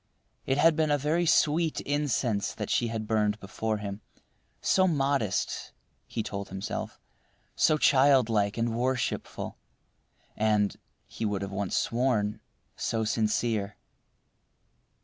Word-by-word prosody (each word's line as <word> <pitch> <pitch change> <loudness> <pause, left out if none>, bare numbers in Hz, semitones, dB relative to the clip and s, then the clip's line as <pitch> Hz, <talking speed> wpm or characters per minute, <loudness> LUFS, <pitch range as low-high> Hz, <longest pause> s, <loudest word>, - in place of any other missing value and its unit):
It 135 - +1
had 165 +2 +5
been 155 -1 +1
a 145 - +3
very 160 +5 0
sweet 160 0 +3
incense 135 -7 -1
that - - -4
she 120 - +2
had 110 -1 -3
burned 105 -1 +1
before 110 +2 -3
him; 100 0 -6 0.6
so 190 0 +3
modest 140 - 0 0.3
(he 110 - -3
told 100 -1 -5
himself); 95 +1 -5 0.6
so 155 - +3
childlike 125 -8 +4
and 115 0 0
worshipful, 130 +2 -2 0.8
and 105 -1 +2 0.3
(he - - -7
would 100 -2 -1
once 100 0 -3
have - - +3
sworn) 115 -4 0 0.4
so 110 -1 -1
sincere. 110 -1 0
115 Hz, 120 wpm, -28 LUFS, 105-140 Hz, 0.8 s, had